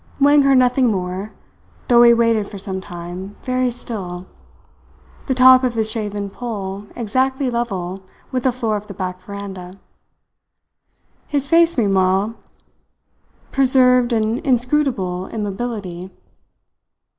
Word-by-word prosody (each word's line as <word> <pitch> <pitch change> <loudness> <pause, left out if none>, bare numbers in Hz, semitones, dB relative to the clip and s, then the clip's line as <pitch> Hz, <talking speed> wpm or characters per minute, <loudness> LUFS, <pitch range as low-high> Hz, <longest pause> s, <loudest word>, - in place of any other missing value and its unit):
Wang 290 +1 +5
heard 275 -1 +4
nothing 255 0 +3
more, 190 0 -3 0.6
though 240 -1 +6
he 240 0 +8
waited 230 -3 +2
for 200 - -9
some 190 -1 -4
time, 180 +2 -8
very 255 -1 0
still, 195 -7 -6 1.0
the 260 - 0
top 255 0 +7
of 250 -2 0
his 220 -1 +1
shaven 205 -2 -3
poll 200 -2 -6
exactly 260 +3 -1
level 195 -6 -3 0.3
with 255 - -1
the 260 - +4
floor 230 -3 -2
of 205 +1 -9
the 200 - -9
back 185 0 -4
veranda. 190 -2 -8 1.5
His 285 -2 -1
face 335 0 +4
meanwhile 195 -1 +2 1.2
preserved 255 -2 +4
an 225 +1 0
inscrutable 245 - 0
immobility. 200 -4 -5
220 Hz, 120 wpm, -19 LUFS, 195-255 Hz, 1.5 s, he